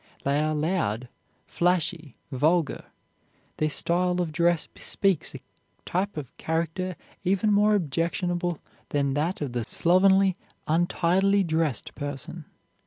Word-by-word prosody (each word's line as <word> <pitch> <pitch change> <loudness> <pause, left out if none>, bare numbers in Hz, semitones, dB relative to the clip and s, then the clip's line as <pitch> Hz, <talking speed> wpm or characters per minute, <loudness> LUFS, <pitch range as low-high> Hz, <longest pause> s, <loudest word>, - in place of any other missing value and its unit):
They 140 +1 +1
are 155 0 0
loud, 150 - -1 0.4
flashy, 170 -4 0 0.2
vulgar. 155 +4 +1 0.7
Their 155 - +1
style 180 +4 +1
of 175 -3 -1
dress 170 0 +2
bespeaks 195 -6 -1
a - - -8 0.4
type 190 +1 -1
of 140 -5 -7
character 170 +3 -2 0.3
even 195 +3 +2
more 210 +1 +4
objectionable 175 +1 -1 0.3
than 140 -2 0
that 155 +6 -1
of 135 -5 -3
the 120 -1 -1
slovenly, 190 - +4 0.3
untidily 180 +4 +2
dressed 160 - -1
person. 145 +3 -6
170 Hz, 115 wpm, -26 LUFS, 150-185 Hz, 0.7 s, more